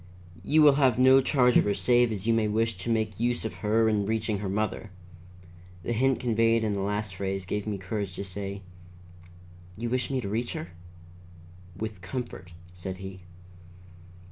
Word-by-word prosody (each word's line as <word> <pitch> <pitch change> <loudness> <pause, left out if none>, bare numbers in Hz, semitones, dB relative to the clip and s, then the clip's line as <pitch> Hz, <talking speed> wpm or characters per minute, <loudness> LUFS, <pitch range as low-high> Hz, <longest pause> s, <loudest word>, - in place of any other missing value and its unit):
You 155 +9 +4
will 145 -2 +6
have 130 -4 +4
no 130 +1 +6
charge 125 -2 +3
of - - +4
her 100 -1 +1
save 120 -1 +3
as 105 -2 -4
you 115 - +3
may 110 -1 +2
wish 110 +1 0
to 90 +6 -5
make 110 -3 -1
use 120 0 0
of 110 - -5
her 110 +1 +3
in 105 -2 +1
reaching 110 -2 -1
the 100 -1 -3
mother." 105 +2 -2 0.9
The 120 - -1
hint 130 +3 +2
conveyed 115 -1 +2
in 105 -2 0
the 100 - -2
last 105 0 -2
phrase 95 -1 -3
gave 105 +3 -3
me 105 -2 -2
courage 95 0 -4
to 100 - -5
say: 100 0 -5 1.1
"You 120 +1 -3
wish 130 0 0
me 135 -1 0
to 115 - -4
reach 115 +4 -2
her?" 160 0 -6 1.1
"With 110 -2 -5
comfort," 90 -3 -6 0.2
said 90 +1 -6
he. 95 0 -8
110 Hz, 180 wpm, -27 LUFS, 100-120 Hz, 1.1 s, will